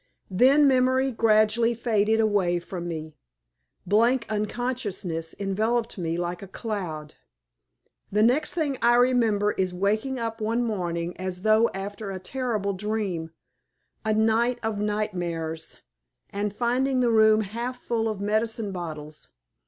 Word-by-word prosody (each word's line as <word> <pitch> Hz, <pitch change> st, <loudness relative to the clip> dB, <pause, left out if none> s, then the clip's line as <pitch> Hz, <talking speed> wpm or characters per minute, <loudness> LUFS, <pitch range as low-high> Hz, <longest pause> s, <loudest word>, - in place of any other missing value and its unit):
Then 270 Hz, +9 st, +5 dB
memory 260 Hz, 0 st, +3 dB
gradually 225 Hz, +1 st, +3 dB
faded 220 Hz, -2 st, +1 dB
away 200 Hz, -5 st, +2 dB
from 175 Hz, 0 st, -6 dB
me. 155 Hz, -2 st, -6 dB, 0.7 s
Blank 230 Hz, +5 st, +3 dB
unconsciousness 210 Hz, -7 st, -3 dB
enveloped 220 Hz, +4 st, -1 dB
me 165 Hz, -1 st, -2 dB
like 175 Hz, 0 st, -3 dB
a 195 Hz, -, -8 dB
cloud. 180 Hz, -8 st, -5 dB, 1.0 s
The 210 Hz, +2 st, +3 dB
next 265 Hz, +9 st, +2 dB
thing 290 Hz, -6 st, -1 dB
I 240 Hz, 0 st, +5 dB
remember 230 Hz, -5 st, +3 dB
is 185 Hz, -2 st, -2 dB
waking 215 Hz, +8 st, 0 dB
up 225 Hz, -1 st, -4 dB
one 230 Hz, +3 st, 0 dB
morning 175 Hz, -6 st, -2 dB
as 185 Hz, 0 st, -5 dB
though 220 Hz, +1 st, +4 dB
after 200 Hz, +1 st, -5 dB
a 190 Hz, -, -4 dB
terrible 210 Hz, -1 st, -2 dB
dream, 195 Hz, -5 st, -3 dB, 0.7 s
a 215 Hz, 0 st, +1 dB
night 225 Hz, +3 st, +2 dB
of 220 Hz, -2 st, -2 dB
nightmares, 175 Hz, -6 st, -3 dB, 0.5 s
and 205 Hz, +1 st, -2 dB
finding 255 Hz, +4 st, +1 dB
the 240 Hz, -1 st, +3 dB
room 220 Hz, -1 st, +5 dB
half 235 Hz, +5 st, -4 dB
full 225 Hz, -2 st, -1 dB
of 215 Hz, -3 st, -4 dB
medicine 215 Hz, +1 st, -1 dB
bottles. 155 Hz, -4 st, -7 dB
215 Hz, 130 wpm, -26 LUFS, 185-235 Hz, 1.0 s, Then